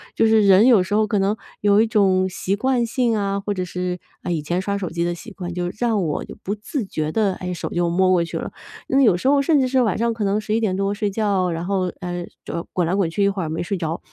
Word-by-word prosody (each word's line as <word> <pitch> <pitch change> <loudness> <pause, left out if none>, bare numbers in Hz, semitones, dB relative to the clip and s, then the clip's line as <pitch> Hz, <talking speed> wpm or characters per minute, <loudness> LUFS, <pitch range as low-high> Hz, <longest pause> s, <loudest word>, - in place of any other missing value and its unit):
就 225 - +3
是 220 -1 +4
人 195 +4 +7
有 225 -8 +6
时 195 - -5
候 215 0 +3
可 210 - 0
能 195 +2 +1 0.3
有 205 +1 +4
一 225 - +2
种 190 -3 +2
习 185 +1 -2
惯 250 +2 +1
性 235 -2 0
啊， 200 -1 -1
或 205 +1 -3
者 185 -1 -2
是， 180 0 -3 0.2
呃， - - -2
以 165 -3 -1
前 175 +4 -1
刷 200 +1 -2
手 190 -4 -3
机 170 0 -2
的 175 0 -1
习 225 +6 -11
惯， 180 -3 -6
就 175 0 -2
让 225 -5 +1
我 155 -3 -2
就 - - -10
不 200 - -2
自 215 +4 -4
觉 155 -5 -3
地， 205 +1 +1
哎， 180 0 -5
手 175 - -5
就 175 0 0
摸 185 +2 +2
过 175 -2 +3
去 170 - -5
了。 - - -5 0.5
有 200 -8 +5
时 180 - -2
候 280 0 +4
甚 295 +1 +3
至 260 - +2
是 260 0 +2
晚 220 -6 +1
上 235 +1 +1
可 225 -1 -3
能 200 +1 +1
11 215 +1 -1
点 210 -5 0
多 195 +1 0
睡 205 0 -1
觉， 200 -3 0
然 165 +1 -3
后， 185 -2 0
呃， 175 -1 -4 0.2
就 170 +2 -5
滚 180 - +1
来 170 - -1
滚 195 -4 +1
去 200 +5 0
一 200 - +4
会 195 -1 -3
儿 160 - -3
没 160 +2 -2
睡 195 +2 -2
着， 165 -1 -3
195 Hz, 295 characters per minute, -21 LUFS, 180-215 Hz, 0.5 s, 人